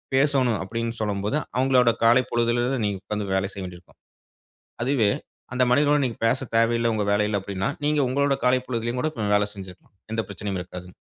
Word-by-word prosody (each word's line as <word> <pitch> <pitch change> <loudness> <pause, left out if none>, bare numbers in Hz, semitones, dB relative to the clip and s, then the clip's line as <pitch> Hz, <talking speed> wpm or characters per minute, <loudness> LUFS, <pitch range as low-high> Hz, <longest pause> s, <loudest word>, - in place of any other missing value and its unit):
பேசணும் 135 -5 +2
அப்படினு 115 +3 -4
சொல்லும்போது, 105 +5 -1 0.2
அவங்களோட 125 -2 +4
காலை 120 +3 +6
பொழுதுல 120 0 +1
இருந்து 125 -1 0
நீங்க 100 -2 -2
உட்கார்ந்து 105 0 -4
வேல 95 +1 0
செய்ய 100 - -6
வேண்டி 90 -1 -8
இருக்கும். 90 - -26 0.8
அதுவே 120 -5 +2 0.4
அந்த 125 - +3
மனிதனுடன் 145 +1 +4
நீங்க 115 - -3
பேச 130 +3 0
தேவையில்ல 115 0 +3
உங்க 105 -1 0
வேலையில 105 0 +1
அப்படினா, 95 -1 -2 0.2
நீங்க 150 0 +2
உங்களுடைய 140 +1 +1
காலை 125 0 +4
பொழுதிலும் 120 0 -2
கூட 155 - 0 0.3
வேல 105 0 +2
செஞ்சிக்கலாம். 95 0 -12 0.2
எந்த 115 - 0
பிரச்சனையும் 100 -1 -4
இருக்காது. 90 0 -9
115 Hz, 175 wpm, -24 LUFS, 100-130 Hz, 0.8 s, காலை